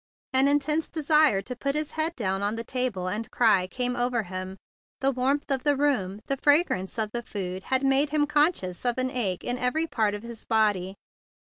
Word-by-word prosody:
An 265 +1 +5
intense 295 +2 +1
desire 305 -9 +3
to 250 +5 -6
put 275 +3 -2
his 305 0 -2
head 320 +2 -1
down 195 -4 -2
on 205 +2 -1
the 230 - -4
table 240 -7 -2
and 215 +4 -3
cry 205 -6 +3
came 250 +4 -2
over 245 -1 0
him. 185 +1 -6 0.4
The 270 0 +2
warmth 275 +3 -1
of 265 -1 +1
the 290 +1 +2
room, 215 -9 0
the 275 - -2
fragrance 285 - +2
of 215 -2 -1
the 240 - -3
food, 190 -5 -5
had 260 +1 +1
made 270 +2 +4
him 300 0 +2
conscious 295 - +1
of 245 -1 0
an 255 0 0
ache 205 -9 -1
in 245 +1 -1
every 305 +6 0
part 220 -9 0
of 205 - -8
his 235 -1 -8
body. 205 -4 +1
250 Hz, 205 wpm, -26 LUFS, 205-285 Hz, 0.4 s, An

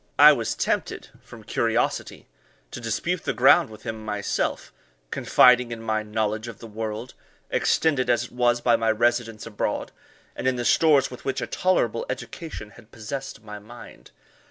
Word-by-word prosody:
I - - +9
was - - -2
tempted, - - -2
from - - -13
curiosity, - - -1 0.5
to - - -6
dispute 165 - -2
the - - -1
ground 130 0 +5
with 110 -1 -13
him 110 -1 -5
myself, 105 -1 -2 0.4
confiding 125 -1 +4
in 115 - -5
my 110 -1 0
knowledge 110 +1 -2
of 115 - -8
the - - -11
world, 110 +2 -5 0.4
extended 140 -6 +1
as 120 -1 +3
it 120 - -10
was 120 -1 +1
by 120 -1 +4
my 115 0 0
residence 115 -1 0
abroad, 110 -3 -3 0.4
and - - -3
in 130 - +2
the 120 -1 -3
stores 150 -3 +4
with 125 - -10
which 135 - -2
a - - -2
tolerable 185 - 0
education 150 -11 -7
had 110 - -17
possessed 125 +1 -7
my 105 -1 -8
mind. 120 +4 -13
120 Hz, 165 wpm, -24 LUFS, 110-125 Hz, 0.5 s, I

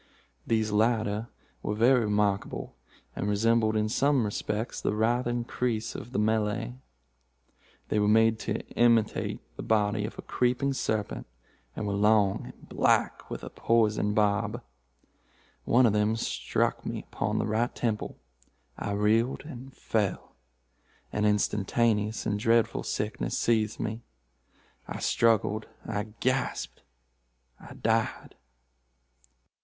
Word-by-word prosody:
These 110 -2 +1
latter 110 0 +1 0.3
were 105 - -2
very 125 +4 +5
remarkable, 105 -1 -1 0.4
and 100 - -2
resembled 110 +1 +2
in 110 0 +1
some 135 +2 +2
respects 105 +2 -3
the - - 0
writhing 120 +2 +1
creese 115 -2 -2
of 120 - -8
the - - -2
Malay. 110 +2 0 1.2
They 105 - +1
were 105 - +2
made 110 +1 +4
to - - -3
imitate 115 -2 +2 0.2
the - - -4
body 105 -1 +1
of 110 - -7
a - - -7
creeping 125 +3 0
serpent, 110 - -2 0.5
and - - -3
were 100 - -1
long 105 -1 +3
and - - -13
black, - - +1
with - - -6
a - - -7
poisoned 105 -2 +1
barb. 105 +3 +1 1.0
One 125 +1 +5
of 110 - +3
them 105 +1 +2
struck 115 - -1
me - - -5
upon - - -1
the - - 0
right 110 +3 0
temple. 110 -3 -2 0.6
I 100 - -2
reeled 110 +5 +2
and 135 -3 -9
fell. 105 -6 -2 0.8
An 105 - +1
instantaneous 105 +1 +1
and 105 0 0
dreadful 115 +1 +2
sickness 105 +1 -2
seized 110 -2 +1
me. 110 +1 -3 0.9
I - - -5
struggled—I 110 -1 0
gasped—I - - -5
died." 115 0 -1
110 Hz, 120 wpm, -28 LUFS, 105-115 Hz, 1.2 s, very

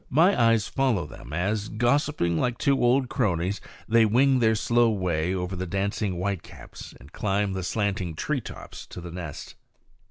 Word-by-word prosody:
My 170 +8 +4
eyes 115 -2 +3
follow 130 - 0
them 75 - -11
as, 100 +6 -1
gossiping 120 - +1
like 120 +8 0
two 135 -2 +2
old 125 +2 +3
cronies, 95 -5 -1 0.3
they 115 0 +5
wing 130 +5 +4
their 110 -2 +3
slow 120 +2 +3
way 90 -5 0
over 90 0 -3
the 95 0 -4
dancing 100 +2 -1
whitecaps 95 +1 -6
and 70 +4 -16
climb 100 -1 0
the 95 - -3
slanting 95 -3 -2
tree 140 - -1
tops - - -10
to - - -9
the 85 0 -8
nest. 85 -4 -7
105 Hz, 165 wpm, -26 LUFS, 90-120 Hz, 0.3 s, they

